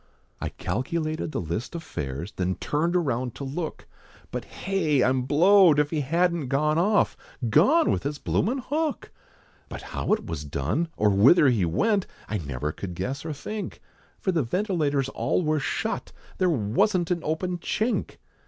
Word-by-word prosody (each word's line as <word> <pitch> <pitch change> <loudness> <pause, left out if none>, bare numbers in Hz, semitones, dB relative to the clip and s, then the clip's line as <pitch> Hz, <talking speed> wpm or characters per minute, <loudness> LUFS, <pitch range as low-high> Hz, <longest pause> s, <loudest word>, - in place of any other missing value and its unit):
I - - -3
calculated 155 +4 -2
the - - -2
list 90 - -4
of 165 - -5
fares, 70 +7 -5
Then 95 -1 -1
turned 165 +4 -1
around 130 -8 0
to - - -6
look, 150 +4 -4 0.5
But - - -4
hey! 160 -9 0
I'm 130 0 +2
blowed, 175 +2 +6
if 150 0 +2
he 155 -2 0
hadn't 170 +1 +1
gone 150 +4 +2
off, 205 +4 +3 0.4
Gone! 295 - +5
with - - 0
his 145 +1 -3
bloomin' 230 - 0
hook! 305 0 -2 0.6
But - - -7
how - - -3
it - - -1
was 80 -3 -4
done, 75 - -1
or 105 -1 +3
whither 135 - +6
he 110 -8 +2
went, 200 - +1 0.2
I 105 - -2
never 75 -1 -3
could 90 +1 -7
guess, 135 +9 -3
or 160 - -4
think, 210 +8 -6 0.4
For 190 - 0
the 165 -3 +1
ventilators 150 - 0
all 180 - 0
were 155 -1 +1
shut, 135 - -2 0.3
There 185 - +3
wasn't 165 - +1
an 175 - +1
open 175 +3 -2
chink! 220 +7 -1
150 Hz, 165 wpm, -26 LUFS, 120-180 Hz, 0.6 s, blowed